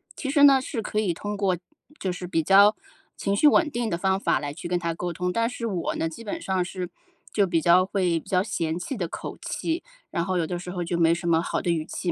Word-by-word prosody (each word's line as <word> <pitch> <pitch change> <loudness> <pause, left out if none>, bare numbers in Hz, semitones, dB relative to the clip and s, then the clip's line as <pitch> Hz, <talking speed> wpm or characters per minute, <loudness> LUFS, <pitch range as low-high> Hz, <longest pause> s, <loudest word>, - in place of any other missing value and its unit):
其 275 - -4
实 285 0 +4
呢， 275 -2 +8
是 240 -4 -4
可 210 - -1
以 205 -5 +1
通 205 +5 -4
过 195 -3 +1 0.4
就 190 - -1
是 180 0 -6
比 165 -2 0
较 200 +4 +6 0.4
情 200 0 0
绪 300 - +5
稳 320 +2 +5
定 235 -2 -1
的 170 - -1
方 190 +2 +1
法 - - +1
来 145 -1 -4
去 170 - -7
跟 180 0 0
他 170 -1 -2
沟 175 +1 -3
通。 180 +2 -2
但 230 +1 +1
是 240 -2 -5
我 185 -6 -2
呢， 165 - -1
基 165 +8 -8
本 205 - -4
上 190 -2 0
是 180 -1 -5 0.4
就 200 -2 +3
比 170 -2 +2
较 175 +3 +5
会 180 -4 0
比 - - -16
较 185 0 +2
嫌 165 -5 -2
弃 215 +9 -4
的 175 -5 -2
口 - - -7
气， 330 +1 -3 0.3
然 170 - -1
后 185 0 0
有 165 - +1
的 175 +1 -4
时 180 - -8
候 180 -1 -3
就 170 0 -2
没 165 -1 +4
什 175 0 -5
么 165 0 +4
好 - - -2
的 175 - 0
语 160 -2 -1
气 175 +1 -3
180 Hz, 285 characters per minute, -25 LUFS, 170-205 Hz, 0.4 s, 呢